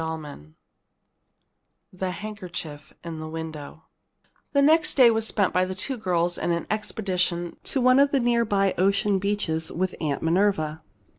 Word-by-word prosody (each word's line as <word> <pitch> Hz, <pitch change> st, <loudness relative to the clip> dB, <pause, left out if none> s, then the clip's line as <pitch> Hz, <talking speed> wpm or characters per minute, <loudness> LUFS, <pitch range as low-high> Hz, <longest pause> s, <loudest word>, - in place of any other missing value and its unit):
CHAPTER 160 Hz, -2 st, -5 dB
V 75 Hz, -, -16 dB, 1.5 s
THE 185 Hz, 0 st, -3 dB
HANDKERCHIEF 180 Hz, -7 st, -7 dB
IN 165 Hz, -2 st, -6 dB
THE 155 Hz, -, -6 dB
WINDOW 160 Hz, -1 st, -7 dB, 0.7 s
The 280 Hz, -, +3 dB
next 320 Hz, +3 st, +4 dB
day 250 Hz, -4 st, +7 dB
was 225 Hz, 0 st, 0 dB
spent 200 Hz, -4 st, +1 dB
by 185 Hz, -, +3 dB
the 185 Hz, 0 st, -3 dB
two 260 Hz, +8 st, -2 dB
girls 175 Hz, -5 st, 0 dB
in -, -, -1 dB
an 170 Hz, 0 st, -1 dB
expedition 180 Hz, -5 st, -2 dB
to 270 Hz, -, 0 dB
one 255 Hz, +1 st, +5 dB
of 280 Hz, 0 st, +5 dB
the 275 Hz, -, +1 dB
near 235 Hz, -1 st, +2 dB
by 195 Hz, -3 st, +1 dB
ocean 195 Hz, +1 st, +2 dB
beaches 180 Hz, -5 st, -1 dB
with 185 Hz, +1 st, -2 dB
Aunt 150 Hz, -3 st, -2 dB
Minerva. 160 Hz, -3 st, +1 dB
185 Hz, 160 wpm, -25 LUFS, 160-215 Hz, 1.5 s, day